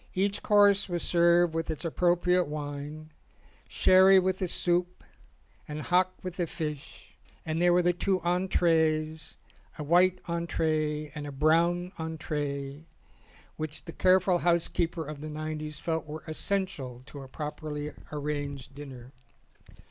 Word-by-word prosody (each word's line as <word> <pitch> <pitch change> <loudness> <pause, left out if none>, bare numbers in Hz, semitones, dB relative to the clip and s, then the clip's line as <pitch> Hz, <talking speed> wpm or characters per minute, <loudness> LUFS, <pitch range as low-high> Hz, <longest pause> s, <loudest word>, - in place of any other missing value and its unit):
Each 195 +2 0
course 205 -1 +4
was 175 -1 -2
served 170 -1 +4
with 165 0 -2
its 160 +2 -4
ap 165 - -3
propriate 180 0 +2
wine, 150 +1 -6 0.6
sherry 190 +1 +6
with 185 0 +1
the 185 - -1
soup 175 +1 -1 0.6
and 150 0 -5
hock 180 +3 +2
with 185 -1 -6
the 175 -2 -1
fish; 150 -4 -7 0.3
and 160 +1 -1
there 175 0 +5
were 175 0 +4
the 175 0 +3
two 185 +2 0
entrees, 160 -3 +1 0.4
a 150 - -4
white 180 +4 +4
entree 155 -3 -1
and 150 -2 -6
a - - -6
brown 170 +5 +2
entree, 150 -2 -4 0.7
which 155 -1 -4
the 165 - -8
careful 185 -1 +3
housekeeper 170 -1 0
of 150 0 -7
the 155 - -6
nineties 155 0 -5
felt 160 0 -3
were 155 +1 -7
essential 155 -7 -3
to 140 +1 -10
a 135 - -10
properly 150 +1 -5 0.2
arranged 145 -2 -4
dinner. 135 -3 -10
160 Hz, 140 wpm, -28 LUFS, 150-175 Hz, 0.7 s, sherry